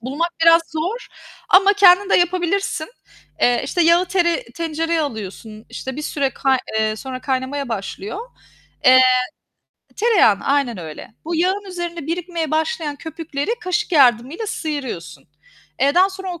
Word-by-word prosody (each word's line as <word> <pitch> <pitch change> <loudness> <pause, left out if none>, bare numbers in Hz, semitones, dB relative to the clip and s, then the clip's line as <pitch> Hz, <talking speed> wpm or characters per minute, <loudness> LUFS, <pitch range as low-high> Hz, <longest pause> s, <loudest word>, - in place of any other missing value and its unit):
Bulmak 285 +8 -2
biraz 330 0 +6
zor 360 +10 -3 0.4
ama 390 +2 +6
kendin 395 -1 +5
de - - +5
yapabilirsin. 355 -1 0 0.5
Eee, 245 -1 +3
işte, 350 - 0
yağı 340 +2 +4
tere 355 +3 +1
tencereye 330 -3 -2
alıyorsun. 220 -4 -6
İşte, 265 +1 -7
bir 300 - -5
süre 280 -3 -1
kay 265 -1 +1 0.2
eee, 215 0 0
sonra 255 +1 -7
kaynamaya 265 +1 -3
başlıyor. 205 - -5 0.7
Eee 255 0 +8 1.0
Tereyağını 405 - +3
aynen 275 -7 0
öyle. 160 +5 -9
Bu 335 +2 -3
yağın 375 +5 0
üzerinde 345 -3 -5
birikmeye 335 -2 -3
başlayan 315 -2 -1
köpükleri 320 0 -5
kaşık 365 -2 -2
yardımıyla 270 - +3
sıyırıyorsun. 235 - -5 0.6
Eee, 280 +2 +3
daha 375 +2 +4
sonra 380 -2 -6
o 335 - -11
320 Hz, 140 wpm, -20 LUFS, 260-355 Hz, 1.0 s, Eee